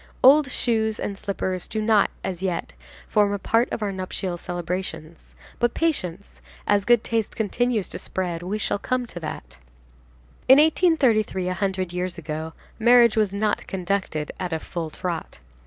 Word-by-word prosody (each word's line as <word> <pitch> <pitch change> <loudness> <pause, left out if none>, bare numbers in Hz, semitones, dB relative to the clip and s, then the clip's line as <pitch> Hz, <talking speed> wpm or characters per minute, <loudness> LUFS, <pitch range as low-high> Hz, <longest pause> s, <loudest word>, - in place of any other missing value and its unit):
Old 280 +2 +7
shoes 220 -3 0
and 200 - -3
slippers 190 -2 -3
do 220 - -3
not, 215 -1 +4
as 180 -2 -4
yet, 180 -3 -2 0.3
form 205 -2 +3
a - - 0
part 230 +4 +1
of 220 - -2
our 205 - -1
nuptial 185 -1 -4
celebrations; 175 -2 -5 0.2
but 240 -1 +1
patience, 200 - -2 0.2
as 205 -1 +2
good 240 -1 +4
taste 225 -2 -1
continues 225 0 0
to - - -6
spread, 175 -3 -3
we 190 +4 -3
shall 205 - -1
come 255 +3 -1
to 180 - -8
that. 160 - -7 0.9
In 265 - +9
1833, 270 - +3
a - - 0
hundred 190 -2 -2
years 180 0 -3
ago, 160 0 -5 0.3
marriage 235 0 +6
was 215 -3 +2
not 205 +1 -1
conducted 185 -5 -2
at 180 -1 -3
a 160 - 0
full 165 0 -5
trot. 170 +1 -5
200 Hz, 160 wpm, -24 LUFS, 180-225 Hz, 0.9 s, In